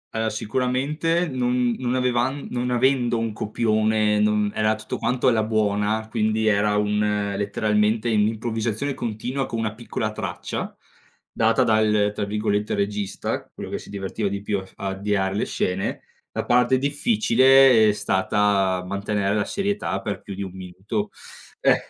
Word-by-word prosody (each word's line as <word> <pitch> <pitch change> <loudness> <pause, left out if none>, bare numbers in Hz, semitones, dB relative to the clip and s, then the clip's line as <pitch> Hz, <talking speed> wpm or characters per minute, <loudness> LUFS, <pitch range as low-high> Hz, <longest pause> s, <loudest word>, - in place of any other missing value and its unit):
Ehm, 110 0 0
sicuramente 130 +10 0
non 125 -3 0
non 125 -1 -1
avevan 125 +2 0
non 125 0 -1
avendo 125 -1 +2
un 115 -1 -2
copione, 110 -1 +1
non 105 -1 +2
era 110 0 +1
tutto 110 - -6
quanto 125 +1 0
alla 115 -3 +4
buona, 110 0 0
quindi, 110 -1 0
era 105 -1 +2
un 105 -1 0
letteralmente 105 +2 +1
un'improvvisazione 110 +4 0
continua 125 +4 -3
con 115 - -4
una 110 -2 -2
piccola 110 -1 -4
traccia, 100 -5 -5 0.5
data - - +2
dal, 105 -1 +3
tra 105 - -2
virgolette, 105 0 -1
"regista," 100 -1 -3
quello - - -8
che - - -3
si - - -13
divertiva 100 +1 -3
di 100 0 -4
più 100 -1 -1
a 95 - -9
f - - -22
a 100 - -5
avviare 95 0 -1
le 100 - 0
scene; 95 +1 -2 0.3
la - - -3
parte 125 +1 +3
difficile 135 - +5
è - - +5
stata 95 -1 +1
mantenere 100 +1 -1
la 105 -1 +1
serietà 200 - -2
per 100 +1 -4
più 100 - -8
di 100 - -4
1 95 - -6
minuto. 95 +3 -4 0.5
Eh, - - +4
110 Hz, 155 wpm, -23 LUFS, 105-120 Hz, 0.5 s, difficile